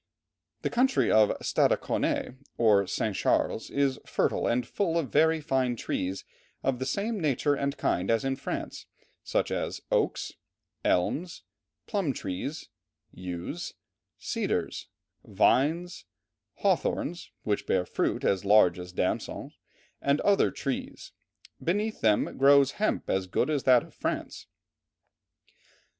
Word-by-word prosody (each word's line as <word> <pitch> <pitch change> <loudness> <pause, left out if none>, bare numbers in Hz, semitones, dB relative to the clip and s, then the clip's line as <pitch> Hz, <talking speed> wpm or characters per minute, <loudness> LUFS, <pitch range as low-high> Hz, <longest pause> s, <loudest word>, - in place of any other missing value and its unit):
The - - -1
country 260 +3 +2
of 110 -1 +4
Stadaconé, 125 - +1 0.2
or 105 -4 +4
St. 100 +1 -1
Charles, 110 - 0
is 140 -2 0
fertile - - 0
and 120 +1 +1
full 170 - -1
of 160 -5 -2
very 160 +2 +4
fine 130 -5 0
trees 95 -3 -3 0.4
of 130 -2 0
the 130 - -2
same 210 +2 -1
nature 145 -2 +1
and 140 0 -2
kind 90 +2 0
as 115 +2 +2
in 135 0 0
France, 135 - -5 0.4
such - - 0
as - - -2
oaks, - - 0 0.5
elms, 160 - 0 0.4
plum 195 -10 -1
trees, 110 - -5 0.4
yews, 90 -2 -6 0.4
cedars, - - -2 0.4
vines, 170 +6 +1 0.5
hawthorns 175 -3 -1
which 105 -1 -1
bear 90 -1 +1
fruit - - -1
as 95 -1 +1
large 100 -4 +5
as 90 0 -8
damsons 90 0 -3 0.5
and 140 +1 +2
other 200 -1 +4
trees; 135 -2 -5 0.5
beneath 210 +5 -1
them 105 +2 +2
grows 140 0 +6
hemp 215 - 0
as 95 -1 0
good 90 - 0
as 145 -3 -1
that 125 -2 +6
of - - -16
France." - - -4
135 Hz, 125 wpm, -28 LUFS, 105-160 Hz, 0.5 s, grows